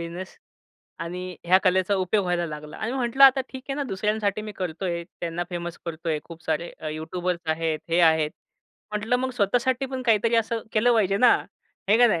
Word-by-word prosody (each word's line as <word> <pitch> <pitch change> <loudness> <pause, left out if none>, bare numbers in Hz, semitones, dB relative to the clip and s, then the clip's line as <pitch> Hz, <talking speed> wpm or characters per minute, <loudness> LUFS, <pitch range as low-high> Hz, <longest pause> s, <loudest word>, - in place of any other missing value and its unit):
Business 170 +3 -7 0.6
आणि 180 +1 -5
ह्या 180 +2 +6
कलेचा 185 +2 +3
उपयोग 190 +2 +1
व्हायला 175 -1 0
लागला. 150 -1 -8
आणि 230 +3 -3
मी - - -2
म्हटलं 255 +3 +5
आता 270 0 +7
ठीक 260 -1 -8
आहे - - 0
ना 290 - -1
दुसऱ्यांसाठी 210 +1 -1
मी 215 - -6
करत 180 -1 -4
आहे, 170 -2 -2 0.2
त्यांना 170 0 -2
फेमस 175 -1 -5
करत 165 0 -6
आहे, 155 -2 +1
खूप 165 -1 -12
सारे 160 +2 -1
अ, 155 - -4
यूट्यूबर्स 170 +3 -3
आहेत, 160 -1 -1
हे 170 - +3
आहेत. 160 -2 +4 0.6
म्हटलं 220 +4 0
मग 260 +1 -2
स्वतःसाठी 245 +4 +1
पण 260 -1 -5
काहीतरी 225 +1 +3
असं 225 0 0
केलं 240 +3 +4
पाहिजे 195 -3 +2
ना, 245 +4 +6 0.6
आहे 215 +3 +5
का 245 - +7
नाही? 175 -7 +1
185 Hz, 200 wpm, -25 LUFS, 170-225 Hz, 0.6 s, आता